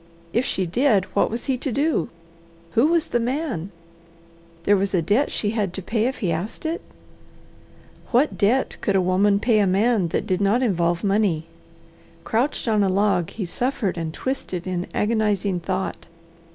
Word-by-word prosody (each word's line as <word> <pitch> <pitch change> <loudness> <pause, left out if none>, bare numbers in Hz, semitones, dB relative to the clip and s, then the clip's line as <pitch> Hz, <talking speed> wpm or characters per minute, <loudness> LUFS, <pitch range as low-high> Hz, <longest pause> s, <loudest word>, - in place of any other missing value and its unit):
If 240 +3 +1
she 190 - -1
did, 210 +1 +2
what - - +2
was 230 +2 -4
he 265 -3 0
to 270 - -2
do? 285 - 0 0.6
Who 235 +6 +4
was 335 0 +1
the 240 - +1
man? 245 - -2 0.9
There 205 - +4
was 195 0 0
a 175 - +3
debt 210 - +2
she 205 - -1
had 205 -5 -1
to 195 - -4
pay 220 +4 0
if 265 - -3
he 170 - +1
asked 175 - -4
it? 325 +2 -2 1.3
What 255 +5 +2
debt 235 +6 +1
could 200 - 0
a - - +5
woman 195 +2 +3
pay 225 0 +3
a 200 - +3
man 200 0 +2
that 165 - -2
did 185 -2 0
not 210 +6 +3
involve 170 -6 +1
money? 195 -6 +1 0.8
Crouched 245 +4 -1
on 215 -2 +3
a 195 - +3
log 195 -3 +2
he 210 - -5
suffered 240 +1 -1
and 165 -2 -3
twisted 185 -5 -4
in 180 -1 -3
agonizing 210 -4 0
thought. 185 +2 -3
205 Hz, 175 wpm, -23 LUFS, 185-240 Hz, 1.3 s, a